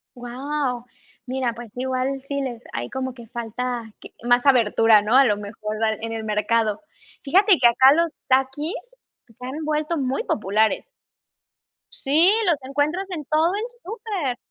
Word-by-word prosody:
Guau. 250 Hz, 0 st, -3 dB, 0.4 s
Mira, 255 Hz, -2 st, -2 dB
pues, 235 Hz, 0 st, -10 dB
igual 260 Hz, +1 st, -2 dB
sí 280 Hz, 0 st, -3 dB
les 245 Hz, -4 st, -5 dB
ahí 120 Hz, +1 st, -4 dB
como 260 Hz, -1 st, -4 dB
que 235 Hz, -2 st, -13 dB
falta 235 Hz, 0 st, -5 dB
q -, -, -11 dB, 0.2 s
más 245 Hz, +1 st, +3 dB
abertura, 225 Hz, -4 st, +5 dB
¿no?, 210 Hz, +3 st, -1 dB
a 270 Hz, +1 st, +7 dB
lo 210 Hz, -4 st, +2 dB
mejor 210 Hz, +1 st, -6 dB, 0.3 s
en 225 Hz, 0 st, -4 dB
el 225 Hz, -1 st, -4 dB
mercado. 215 Hz, +1 st, 0 dB, 0.4 s
Fíjate 380 Hz, +6 st, +4 dB
que 245 Hz, -, +6 dB
acá 260 Hz, +3 st, +6 dB
los 335 Hz, 0 st, +1 dB, 0.2 s
Takis 270 Hz, +5 st, +1 dB, 0.5 s
se 235 Hz, +2 st, -12 dB
han 285 Hz, +5 st, -5 dB
vuelto 305 Hz, +2 st, -1 dB
muy 265 Hz, -2 st, -1 dB
populares. 215 Hz, -, 0 dB, 1.0 s
Sí, 315 Hz, +7 st, +4 dB
los 340 Hz, -5 st, +3 dB
encuentras 290 Hz, +8 st, -1 dB
en 310 Hz, -4 st, -4 dB
todo 315 Hz, +5 st, +2 dB
el 425 Hz, +3 st, -2 dB, 0.2 s
súper. 390 Hz, -, -4 dB
260 Hz, 155 wpm, -23 LUFS, 230-295 Hz, 1.0 s, a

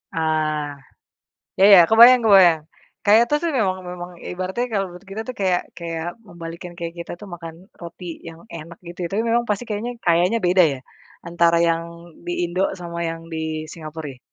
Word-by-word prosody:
Ah, 155 Hz, -2 st, -1 dB, 0.8 s
ya 190 Hz, -, +5 dB
ya -, -, +9 dB
kebayang 235 Hz, +2 st, +8 dB
kebayang, 185 Hz, -7 st, +6 dB, 0.4 s
kayak 220 Hz, +3 st, +6 dB
toast 295 Hz, +3 st, 0 dB
tuh 335 Hz, -, +1 dB
memang 185 Hz, -3 st, 0 dB
memang 180 Hz, 0 st, -7 dB, 0.2 s
ibaratnya 185 Hz, +7 st, -3 dB
kalau 195 Hz, -2 st, 0 dB
menurut 180 Hz, +1 st, -13 dB
kita 215 Hz, +3 st, -5 dB
tuh 255 Hz, -, -4 dB
kayak 185 Hz, -2 st, +2 dB, 0.2 s
kayak 165 Hz, -1 st, -5 dB, 0.2 s
membalikkan 170 Hz, 0 st, -9 dB
kayak 170 Hz, -1 st, -5 dB
kita 170 Hz, -, -6 dB
tuh 210 Hz, -, -9 dB
makan 165 Hz, -1 st, -9 dB, 0.3 s
roti 170 Hz, +1 st, -10 dB, 0.2 s
yang 165 Hz, 0 st, -12 dB, 0.2 s
enak 165 Hz, +1 st, -10 dB
gitu 170 Hz, +1 st, -10 dB
ya 170 Hz, -, -2 dB
tapi 215 Hz, +3 st, 0 dB
memang 235 Hz, +1 st, +3 dB
pasti 210 Hz, +3 st, -1 dB
kayaknya 220 Hz, +3 st, -3 dB
kayaknya 175 Hz, +6 st, +3 dB
beda 180 Hz, +1 st, +5 dB
ya, -, -, -9 dB, 0.5 s
antara 170 Hz, 0 st, +2 dB
yang 165 Hz, 0 st, 0 dB, 0.4 s
di 175 Hz, -, -2 dB
Indo 180 Hz, +2 st, -2 dB, 0.2 s
sama 170 Hz, -1 st, -7 dB
yang 165 Hz, 0 st, -7 dB
di 160 Hz, -1 st, -4 dB
Singapura 160 Hz, -1 st, -8 dB
ya? -, -, -21 dB
175 Hz, 180 wpm, -21 LUFS, 165-195 Hz, 0.8 s, ya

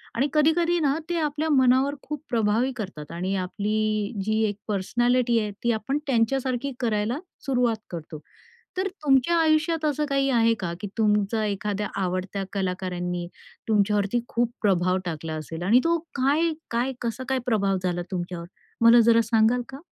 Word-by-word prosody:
आणि 265 Hz, +5 st, +2 dB
कधी-कधीना 320 Hz, -1 st, +3 dB
ते 345 Hz, -, 0 dB
आपल्या 305 Hz, 0 st, -1 dB
मनावर 265 Hz, 0 st, +4 dB
खूप 300 Hz, 0 st, -5 dB
प्रभावी 225 Hz, +2 st, +1 dB
करतात 190 Hz, -, -7 dB
आणि 185 Hz, +3 st, -2 dB
आपली 210 Hz, +3 st, -1 dB
जी 215 Hz, +1 st, +1 dB
1 205 Hz, -, -4 dB
पर्सनॅलिटी 240 Hz, +4 st, +1 dB
आहे, 210 Hz, -1 st, -2 dB
ती 235 Hz, -, +3 dB
आपण 230 Hz, +6 st, -1 dB
त्यांच्यासारखी 260 Hz, +2 st, 0 dB
करायला 225 Hz, +1 st, 0 dB, 0.3 s
सुरुवात 250 Hz, -4 st, +2 dB
करतो. 160 Hz, -2 st, -7 dB, 0.6 s
तर 375 Hz, +1 st, +1 dB, 0.2 s
तुमच्या 275 Hz, +3 st, +3 dB
आयुष्यात 320 Hz, 0 st, +2 dB
असं 300 Hz, 0 st, 0 dB
काही 275 Hz, 0 st, +1 dB
आहे 230 Hz, -3 st, +4 dB
का? 170 Hz, -3 st, -3 dB
की 205 Hz, -, -3 dB
तुमचा 210 Hz, 0 st, +2 dB
एखाद्या 205 Hz, 0 st, -2 dB
आवडत्या 185 Hz, +2 st, -2 dB
कलाकारांनी 180 Hz, -2 st, -2 dB, 0.4 s
तुमच्यावरती 210 Hz, +1 st, +2 dB
खूप 235 Hz, 0 st, 0 dB
प्रभाव 185 Hz, -3 st, +2 dB
टाकला 160 Hz, -1 st, -4 dB
असेल 160 Hz, +2 st, -6 dB
आणि 220 Hz, +7 st, +5 dB
तो 335 Hz, 0 st, +2 dB, 0.2 s
काय 290 Hz, +5 st, +2 dB, 0.2 s
काय 245 Hz, +3 st, 0 dB
कसा 235 Hz, +2 st, -3 dB
काय 265 Hz, -1 st, +1 dB
प्रभाव 200 Hz, -5 st, +1 dB
झाला 175 Hz, -1 st, -1 dB
तुमच्यावर? 175 Hz, -2 st, -4 dB, 0.4 s
मला 230 Hz, +1 st, +8 dB
जरा 230 Hz, 0 st, +6 dB
सांगाल 225 Hz, +2 st, +4 dB
का? 265 Hz, -, -8 dB
225 Hz, 150 wpm, -25 LUFS, 195-270 Hz, 0.6 s, मला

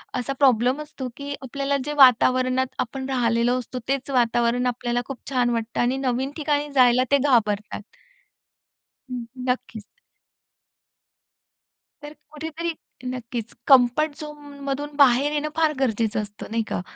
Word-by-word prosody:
असा 255 Hz, +2 st, -2 dB
प्रॉब्लेम 255 Hz, +1 st, +3 dB
असतो, 295 Hz, -4 st, -7 dB
की 285 Hz, 0 st, -5 dB
आपल्याला 275 Hz, +2 st, -2 dB
जे 295 Hz, -, -3 dB
वातावरणात 255 Hz, 0 st, +5 dB
आपण 265 Hz, +2 st, -3 dB
राहिलेलो 240 Hz, -1 st, +1 dB
असतो 250 Hz, +1 st, -6 dB
तेच 275 Hz, 0 st, -2 dB
वातावरण 240 Hz, 0 st, +2 dB
आपल्याला 240 Hz, 0 st, -1 dB
खूप 270 Hz, -3 st, -7 dB
छान 250 Hz, -2 st, +1 dB
वाटतं 230 Hz, -1 st, -2 dB
आणि 250 Hz, +2 st, +1 dB
नवीन 265 Hz, +1 st, -1 dB
ठिकाणी 295 Hz, -1 st, 0 dB
जायला 250 Hz, -1 st, +5 dB
ते 280 Hz, -, +6 dB
घाबरतात. 215 Hz, -7 st, +1 dB, 1.3 s
हं, 245 Hz, -2 st, -4 dB, 0.3 s
नक्कीच. 250 Hz, -4 st, -3 dB, 2.2 s
तर 295 Hz, -, -8 dB, 0.2 s
कुठेतरी 320 Hz, +2 st, -4 dB, 0.3 s
नक्कीच 240 Hz, -2 st, -5 dB
कम्फर्ट 270 Hz, +3 st, +5 dB
झोनमधून 290 Hz, -1 st, -6 dB
बाहेर 280 Hz, +1 st, +4 dB
येणं 300 Hz, 0 st, -1 dB
फार 320 Hz, -2 st, +2 dB
गरजेचं 225 Hz, -4 st, 0 dB
असतं, 210 Hz, 0 st, -9 dB
नाही 225 Hz, 0 st, 0 dB
का? -, -, -2 dB
255 Hz, 125 wpm, -23 LUFS, 240-285 Hz, 2.2 s, ते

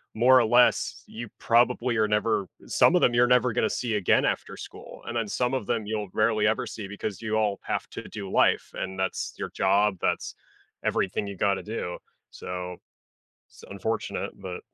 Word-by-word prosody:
more 130 Hz, +3 st, +6 dB
or 120 Hz, -, +3 dB
less, 120 Hz, +2 st, +3 dB
you 120 Hz, +2 st, -7 dB
probably 120 Hz, 0 st, +2 dB
are 110 Hz, -1 st, +3 dB
never 105 Hz, -2 st, +1 dB, 0.2 s
some 180 Hz, -, +4 dB
of 180 Hz, -, +4 dB
them, 120 Hz, -, +4 dB
you're 120 Hz, +1 st, +4 dB
never 125 Hz, -1 st, +3 dB
gonna 110 Hz, -, +1 dB
see 120 Hz, -3 st, -2 dB
again 100 Hz, -3 st, +3 dB
after -, -, -2 dB
school. -, -, -10 dB
And 120 Hz, -, -5 dB
then 115 Hz, -2 st, 0 dB
some 125 Hz, +4 st, -1 dB
of 130 Hz, -6 st, -2 dB
them, 110 Hz, -2 st, -1 dB
you'll 105 Hz, -2 st, -3 dB
rarely 110 Hz, -1 st, +2 dB
ever 110 Hz, -, +1 dB
see 105 Hz, -3 st, -7 dB
because 105 Hz, -1 st, -5 dB
you 110 Hz, -1 st, -2 dB
all 105 Hz, -2 st, +1 dB
have -, -, -2 dB
to -, -, -6 dB
do 100 Hz, -3 st, -7 dB
life, -, -, +2 dB
and 95 Hz, 0 st, -5 dB
that's 95 Hz, -, -2 dB
your -, -, -4 dB
job. 100 Hz, 0 st, +2 dB
That's -, -, -1 dB, 0.5 s
everything 100 Hz, +2 st, 0 dB
you 100 Hz, -, -6 dB
gotta 100 Hz, -1 st, +1 dB
do, 105 Hz, -5 st, -4 dB, 0.3 s
so 90 Hz, 0 st, -6 dB, 0.7 s
so, -, -, -16 dB
it's -, -, -10 dB
unfortunate, 105 Hz, +2 st, -3 dB
but 90 Hz, -2 st, -6 dB
110 Hz, 190 wpm, -26 LUFS, 100-120 Hz, 0.7 s, more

